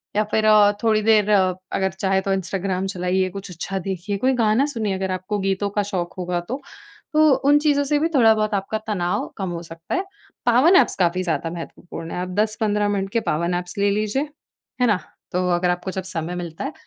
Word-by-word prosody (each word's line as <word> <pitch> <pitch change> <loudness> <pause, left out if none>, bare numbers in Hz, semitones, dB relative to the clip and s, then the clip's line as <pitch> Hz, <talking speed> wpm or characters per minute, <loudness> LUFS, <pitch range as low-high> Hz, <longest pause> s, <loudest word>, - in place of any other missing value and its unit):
या 215 - +3
फिर 215 +1 +2
अ, 210 -1 +6
थोड़ी 220 -1 +3
देर 215 -1 +4
अगर 185 -1 +1
चाहे 190 +1 0
तो 195 0 0
इंस्टाग्राम 190 0 -2
चलाइए, 185 0 0
कुछ 195 +1 -8
अच्छा 180 +3 -4
देखिए, 190 +2 -3
कोई 260 +6 +2
गाना 225 +3 +3
सुनिए, 225 -8 -2
अगर 190 0 -2
आपको 185 +3 -2
गीतों 195 +1 0
का 205 - +3
शौक़ 185 -4 -3
होगा 180 -1 -1
तो। 265 +3 -3 0.5
तो 310 -1 +6 0.2
उन 290 - +7
चीज़ों 290 -1 +2
से 295 +1 +1
भी 320 - +2
थोड़ा 225 -4 +6
बहुत 215 0 -1
आपका 195 +2 -2
तनाव 180 -4 -1
कम 190 -2 -3
हो 170 -1 -4
सकता 165 0 -6
है। 370 - 0 0.4
पावर 250 +8 +5
नैप्स 375 - +5
काफ़ी 180 0 +1
ज़्यादा 165 -1 -1
महत्वपूर्ण 165 0 -8
है। - - -4
आप 180 - -4
10-15 210 -1 +1
मिनट 195 -1 -1
के 230 - +3
पावर 170 +3 0
नैप्स 180 +1 -3
ले 200 0 +2
लीजिए। 215 +7 0 0.6
है 245 - +5
ना? 210 -4 +3 0.3
तो 180 0 0
अगर 180 +1 +1
आपको 180 +2 -3
जब 190 0 -4
समय 175 -1 -4
मिलता 170 -2 -5
है, 285 - -4
195 Hz, 210 wpm, -22 LUFS, 180-215 Hz, 0.6 s, उन